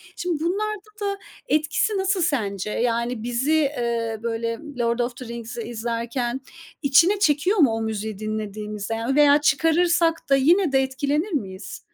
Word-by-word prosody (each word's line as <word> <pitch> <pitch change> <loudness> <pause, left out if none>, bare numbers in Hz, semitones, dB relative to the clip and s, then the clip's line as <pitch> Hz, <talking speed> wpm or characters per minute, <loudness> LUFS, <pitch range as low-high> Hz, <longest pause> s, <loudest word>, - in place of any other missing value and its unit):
Şimdi 340 -3 -2
bunlarda 425 +3 -2
da 400 -1 -1 0.3
etkisi 310 +7 +1
nasıl 385 -1 +1
sence? 210 - -1
Yani, 235 -1 -1
bizi, 245 +5 -1
eee, 235 -6 0
böyle, 230 0 -2 0.2
Lord 235 0 +1
of 240 0 -1
the 255 - -8
Rings'i 235 0 -6
izlerken 235 +2 -3 0.4
içine 335 +9 +4
çekiyor 335 +5 +2
mu 275 -9 +5
o 225 0 -2
müziği 220 -1 -3
dinlediğimizde, 215 0 -4
ya, 235 +5 -1
veya 290 0 +6
çıkarırsak 330 +2 +2
da 275 - +6
yine 330 +4 +3
de 270 - +4
etkilenir 285 +8 -1
miyiz? 190 -7 -4
260 Hz, 145 wpm, -23 LUFS, 230-315 Hz, 0.4 s, veya